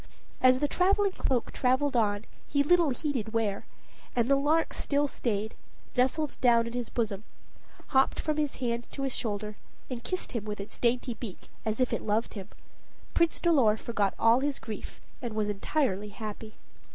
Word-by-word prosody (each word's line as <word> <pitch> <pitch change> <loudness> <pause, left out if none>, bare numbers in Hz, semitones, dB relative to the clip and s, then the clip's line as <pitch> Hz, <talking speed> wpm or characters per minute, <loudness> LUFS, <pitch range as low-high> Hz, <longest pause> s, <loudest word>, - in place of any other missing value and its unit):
As 255 0 +6
the 290 +2 +1
traveling 390 +4 +3
cloak 255 -9 -1
traveled 260 +2 +1
on, 210 -2 +2 0.2
he 285 0 +2
little 340 +1 +4
heeded 250 -5 -2
where, 215 -3 -1 0.5
and 235 -1 +2
the 275 - +5
lark 300 +4 +2
still 285 0 +1
stayed, 220 -5 -2 0.4
nestled 265 +4 +1
down 235 -2 +5
in 235 - -5
his 245 -2 -3
bosom, 215 -4 -2 0.7
hopped 265 0 +3
from 305 -1 -1
his 300 -2 0
hand 240 -1 -2
to 275 - -4
his 270 -2 -1
shoulder, 210 -2 -3 0.3
and 240 -2 -4
kissed 365 +9 -2
him 230 -5 -2
with 210 -1 -4
its 200 - -8
dainty 245 +1 +1
beak, 220 -4 -9 0.2
as 220 +1 -1
if 255 - +2
it - - -1
loved 215 +2 0
him, 200 -2 -7 0.6
Prince 335 -1 +2
Dolor 265 -11 +4
forgot 210 -4 -1
all 230 +2 +5
his 280 0 -1
grief, 220 -2 -7 0.2
and 235 -4 -4
was 210 -1 0
entirely 210 -1 0
happy. 215 +1 -7
240 Hz, 175 wpm, -29 LUFS, 215-280 Hz, 0.7 s, As